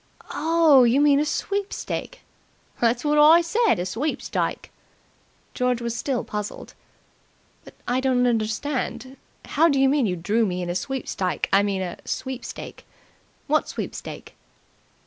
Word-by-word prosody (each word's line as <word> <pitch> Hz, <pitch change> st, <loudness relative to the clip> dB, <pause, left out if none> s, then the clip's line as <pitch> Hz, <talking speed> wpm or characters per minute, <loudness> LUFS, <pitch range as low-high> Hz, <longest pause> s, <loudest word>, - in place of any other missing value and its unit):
"Oh, 320 Hz, -4 st, +5 dB
you 240 Hz, +3 st, +3 dB
mean 290 Hz, -1 st, +5 dB
a 300 Hz, -, +1 dB
sweepstake!" 405 Hz, +8 st, -3 dB, 0.6 s
"That's 235 Hz, +3 st, +1 dB
wot 295 Hz, 0 st, +3 dB
I 315 Hz, +3 st, +8 dB
said 425 Hz, -, +2 dB
a 175 Hz, -, -2 dB
sweepstike." 250 Hz, +11 st, -3 dB, 0.8 s
George 250 Hz, -1 st, 0 dB
was 235 Hz, -1 st, -3 dB
still 245 Hz, +1 st, -2 dB
puzzled. 210 Hz, -1 st, -6 dB, 0.9 s
"But -, -, -15 dB
I 245 Hz, +1 st, +1 dB
don't 255 Hz, -1 st, +2 dB
understand. 240 Hz, +2 st, -2 dB, 0.3 s
How 325 Hz, +3 st, +3 dB
do 280 Hz, -3 st, +1 dB
you 270 Hz, -, +5 dB
mean 275 Hz, -3 st, +2 dB
you 180 Hz, -, -1 dB
drew 205 Hz, +7 st, 0 dB
me 180 Hz, -1 st, -3 dB
in 175 Hz, -, -3 dB
a -, -, -2 dB
sweepstike 195 Hz, -3 st, -3 dB
I 195 Hz, -, +6 dB
mean 200 Hz, -2 st, -1 dB
a 175 Hz, -2 st, -6 dB
sweepstake? 260 Hz, -1 st, -6 dB, 0.6 s
What 305 Hz, +1 st, +1 dB
sweepstake?" -, -, -7 dB
255 Hz, 140 wpm, -24 LUFS, 220-295 Hz, 0.9 s, I